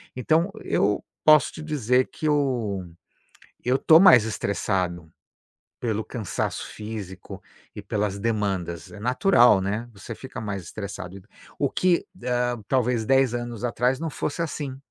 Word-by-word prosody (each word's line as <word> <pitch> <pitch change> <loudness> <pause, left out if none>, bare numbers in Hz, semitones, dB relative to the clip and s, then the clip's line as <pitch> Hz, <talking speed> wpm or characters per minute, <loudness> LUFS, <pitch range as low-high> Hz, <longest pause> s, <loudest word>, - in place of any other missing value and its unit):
Então 160 +9 +1
eu 105 +1 +1 0.2
posso 155 -3 +6
te - - -8
dizer 130 -5 +1
que 155 - -3
eu 125 -10 0 0.8
eu 125 +1 +3
estou 160 +3 +6
mais 125 - +8
estressado 90 -5 -2 0.7
pelo 110 -2 -1
cansaço 110 -7 -3
físico 105 -4 -8 0.3
e - - -6
pelas 100 -1 -2
demandas, 100 -7 -2
é - - -11
natural, 125 - +4
né, 105 +5 -3
você 105 +3 -9
fica 130 +1 -8
mais 105 -3 -4
estressado. 100 0 -7 0.4
O 140 - +1
que, 180 -2 +2 0.2
hãm, 125 -2 0
talvez 125 -3 +1
10 135 0 +3
anos 120 -2 -5
atrás 125 +3 0
não 165 - -2
fosse 145 +3 -4
assim, 145 -4 -4
120 Hz, 135 wpm, -25 LUFS, 100-130 Hz, 0.8 s, mais